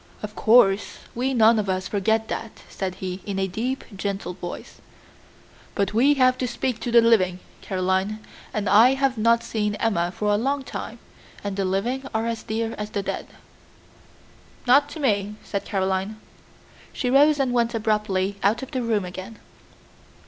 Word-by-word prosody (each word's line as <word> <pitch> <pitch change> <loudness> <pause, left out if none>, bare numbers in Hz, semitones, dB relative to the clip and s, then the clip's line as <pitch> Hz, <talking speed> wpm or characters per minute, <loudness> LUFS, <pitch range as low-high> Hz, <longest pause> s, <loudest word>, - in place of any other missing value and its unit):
"Of 210 0 -5
course, 210 -4 +4 0.2
we 255 +3 -1
none 225 -1 +5
of 205 -2 -2
us 185 0 -1
forget 220 +2 0
that," 225 - -6
said 185 -1 -4
he, 185 0 -5
in 200 -2 -4
a 190 0 0
deep, 240 +8 -3
gentle 195 -2 -3
voice; 175 -1 -8 0.9
"but 200 -1 0
we 270 +6 +4
have 255 -1 +3
to 255 - 0
speak 245 0 -2
to 240 - -3
the 235 0 +7
living, 195 -6 +3 0.2
Caroline, 190 +2 -1 0.3
and 210 -2 -2
I 230 +7 +6
have 270 -1 +1
not 230 +1 +3
seen 210 -2 -1
Emma 185 -7 0
for 210 +2 -1
a - - +3
long 275 +5 -1
time, - - -6 0.5
and 200 -1 -3
the 195 -1 -1
living 225 +8 -1
are 220 +1 0
as 230 -1 -2
dear 225 +1 -3
as 210 0 -4
the 200 -2 -3
dead." - - -4 1.4
"Not 280 +4 +5
to 315 - -8
me," 210 -6 0
said 200 - -4
Caroline. 190 +2 -1 0.7
She 250 -2 -2
rose 290 +2 +5
and 260 -3 +1
went 235 -1 +1
abruptly 210 -3 0
out 215 +6 +2
of 265 - -8
the 255 - -2
room 220 -5 0
again. 185 +4 -8
215 Hz, 170 wpm, -24 LUFS, 195-240 Hz, 1.4 s, the